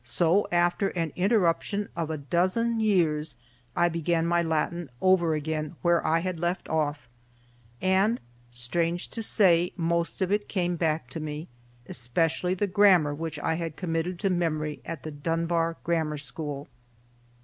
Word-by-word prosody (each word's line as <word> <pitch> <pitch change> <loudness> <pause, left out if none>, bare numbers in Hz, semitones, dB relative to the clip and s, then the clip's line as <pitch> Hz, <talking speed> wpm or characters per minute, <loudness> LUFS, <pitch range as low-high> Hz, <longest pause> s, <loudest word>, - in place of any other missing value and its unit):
So, 165 +11 +2
after 175 +3 +2
an 165 -5 -2
interruption 200 +1 +1
of 165 -2 -2
a 160 - -2
dozen 185 - +1
years, 165 -8 +1 0.4
I 175 0 +4
began 170 0 0
my 170 0 +2
Latin 165 0 -1
over 175 -4 +3
again 155 +1 -3
where 175 -1 +3
I 165 +1 +2
had 185 -2 -3
left 175 +2 -2
off; 145 -5 -1 0.8
and, 195 +5 +3 0.3
strange 165 +9 -2
to 230 - -5
say, 180 -5 +3
most 170 0 -1
of 185 - -1
it 205 0 0
came 180 -3 0
back 160 -5 0
to 160 - -4
me, 150 +1 -5 0.4
especially 165 +9 0
the 205 - 0
grammar 185 -6 +4
which 160 0 -5
I 160 - +1
had 165 -2 -4
committed 170 0 -2
to 195 -2 +1
memory 155 -4 -1
at 165 -5 -6
the 155 - -5
Dunbar 165 +2 -1
Grammar 160 -3 0
School. 145 0 -4
170 Hz, 150 wpm, -27 LUFS, 155-180 Hz, 0.8 s, I